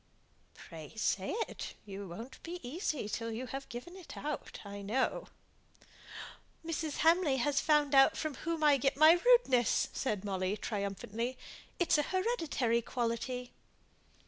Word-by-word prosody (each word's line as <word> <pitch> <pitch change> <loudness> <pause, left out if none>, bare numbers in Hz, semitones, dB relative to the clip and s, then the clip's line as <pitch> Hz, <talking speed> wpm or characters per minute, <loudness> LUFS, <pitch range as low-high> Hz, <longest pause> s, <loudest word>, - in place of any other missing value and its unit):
"Pray 160 -3 -11
say 195 -3 0 0.2
it. - - -7
You 200 -1 -7
won't 225 +9 -9
be 350 +2 -6
easy 300 - -2
till 230 +2 -3
you 235 +3 -4
have 270 +1 -6
given 255 +9 -8
it 370 -4 -10
out, 300 0 -5
I 200 0 -7
know." 220 +7 -1 1.4
"Mrs. 320 -2 -3
Hamley 325 -5 +4
has 285 +3 +1
found 300 -2 +3
out 270 -1 +6
from 310 -2 -2
whom 330 +2 -3
I 290 -2 +6
get 270 +1 0
my 315 +3 +7
rudeness," 470 - +4
said 210 -6 -2
Molly, 190 0 -1
triumphantly. 210 +4 -3 0.4
"It's 345 -3 +3
an 295 - +1
hereditary 325 - 0
quality." 245 +1 -3
260 Hz, 140 wpm, -33 LUFS, 220-310 Hz, 1.4 s, my